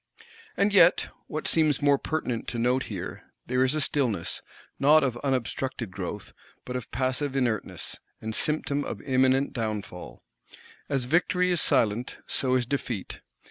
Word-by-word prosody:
And 200 0 +2
yet, 180 -3 +5 0.2
what 155 - -4
seems 155 -4 +3
more 140 -1 +3
pertinent 130 -7 -2
to 120 - -3
note 125 +3 +1
here, 95 -5 -6 0.2
there 125 +1 +2
is 130 +3 +2
a - - +1
stillness, 120 - 0 0.4
not 150 +2 +6
of 130 -3 0
unobstructed 130 -3 -2
growth, - - -6 0.3
but 125 - -5
of 125 -4 -4
passive 130 +2 -1
inertness, 120 -6 -2 0.2
and 110 0 -5
symptom 145 +1 0
of - - -5
imminent 130 0 +2
downfall. 105 -5 -5 0.7
As 135 -3 0
victory 180 +5 +2
is 175 - +3
silent, 115 +2 +2
so 130 -1 +1
is 125 -1 +2
defeat. 120 -6 -4
130 Hz, 145 wpm, -27 LUFS, 120-145 Hz, 0.7 s, not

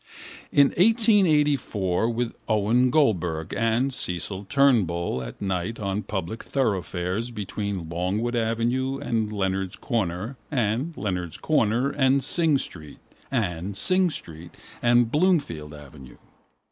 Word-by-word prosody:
In 140 -1 +5
1884 150 - +3
with 120 0 -2 0.2
Owen 110 +4 +3
Goldberg 90 - +1
and 115 +4 +1
Cecil 95 -1 -2
Turnbull 95 - +2
at - - -8
night 95 +2 -2
on 100 0 -2
public 105 +2 -4
thoroughfares 100 -3 -1
between 100 -4 -4
Longwood 95 +8 -2
avenue 120 +4 0
and 110 -4 -2
Leonard's 95 -2 -2
corner 110 +1 -3
and 125 +5 -1
Leonard's 90 -5 -3
corner 125 -2 +1
and 135 -1 +2
Synge 155 0 +2
street 75 -4 -10 0.3
and 100 -6 -2
Synge 185 -3 +3
street 80 +1 -10 0.2
and 120 -1 +3
Bloomfield 145 - +1
avenue. 70 -3 -13
110 Hz, 110 wpm, -25 LUFS, 90-135 Hz, 0.3 s, In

